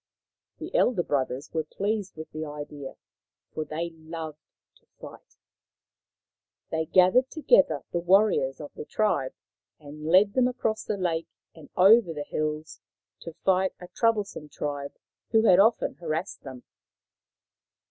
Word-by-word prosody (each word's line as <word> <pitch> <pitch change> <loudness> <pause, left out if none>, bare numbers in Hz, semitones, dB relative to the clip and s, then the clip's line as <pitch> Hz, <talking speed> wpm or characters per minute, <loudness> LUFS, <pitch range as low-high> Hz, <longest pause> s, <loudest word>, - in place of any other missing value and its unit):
' - - -64
The - - -8
elder 245 - +2
brothers 135 -1 -2
were 160 -1 0
pleased 200 +5 -3
with 155 0 -9
the 155 0 -5
idea, 145 -2 -7 0.6
for 155 - -2
they 165 +3 -4
loved 160 -1 -8 0.4
to - - -35
fight. - - -13 1.3
They 160 0 -1
gathered 185 +8 +4
together 330 +12 +3
the 175 - 0
warriors 180 -7 +3
of 150 -2 -9
the - - -7
tribe 150 -8 -1 0.4
and 150 +1 -9
led 190 +4 +5
them 255 -1 +3
across 230 -3 -2
the 210 - -3
lake 165 -3 -1 0.3
and 160 -3 -15
over 195 -1 +6
the 145 - -3
hills 155 +1 -4 0.4
to 170 - -9
fight 190 0 +2
a 180 - -11
troublesome 210 -9 -1
tribe 145 -1 -5 0.4
who 220 0 +3
had 185 -5 +6
often 225 +4 +3
harassed 170 +2 -4
them. 130 -3 -10
165 Hz, 140 wpm, -27 LUFS, 150-200 Hz, 1.3 s, over